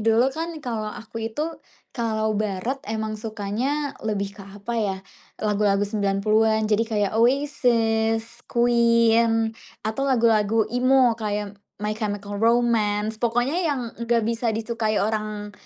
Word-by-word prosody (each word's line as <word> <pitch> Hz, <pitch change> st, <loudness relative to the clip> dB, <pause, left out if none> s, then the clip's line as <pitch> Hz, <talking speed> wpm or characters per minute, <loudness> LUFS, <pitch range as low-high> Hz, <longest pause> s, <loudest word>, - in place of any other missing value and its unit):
dulu 225 Hz, +4 st, +3 dB
kan 330 Hz, +3 st, -3 dB, 0.2 s
kalau 220 Hz, -3 st, -2 dB
aku 225 Hz, +1 st, -8 dB
itu, 265 Hz, +7 st, -3 dB, 0.5 s
kalau 220 Hz, -3 st, -1 dB
barat 215 Hz, +6 st, -2 dB
emang 220 Hz, -1 st, -3 dB
sukanya 230 Hz, +7 st, -2 dB
lebih 200 Hz, -2 st, -2 dB
ke, -, -, -8 dB
apa 200 Hz, +3 st, -7 dB
ya, 195 Hz, -3 st, 0 dB, 0.5 s
lagu-lagu 205 Hz, -1 st, +2 dB
90-an 215 Hz, +2 st, +1 dB
jadi 220 Hz, +2 st, +3 dB
kayak 205 Hz, -2 st, 0 dB
Oasis, 230 Hz, -4 st, +1 dB
Queen 230 Hz, -1 st, +3 dB, 0.3 s
atau 220 Hz, +5 st, -2 dB
lagu-lagu 225 Hz, -3 st, +3 dB
emo 255 Hz, 0 st, +4 dB
kayak 210 Hz, -1 st, -2 dB, 0.3 s
My 210 Hz, -, 0 dB
Chemical 205 Hz, -2 st, -4 dB
Romance 220 Hz, -2 st, +2 dB
pokoknya 240 Hz, +6 st, +1 dB
yang 280 Hz, -4 st, 0 dB, 0.2 s
nggak 235 Hz, 0 st, +1 dB
bisa 230 Hz, +1 st, 0 dB
disukai 225 Hz, -1 st, -1 dB
orang 210 Hz, -1 st, -3 dB
225 Hz, 125 wpm, -24 LUFS, 210-235 Hz, 0.5 s, emo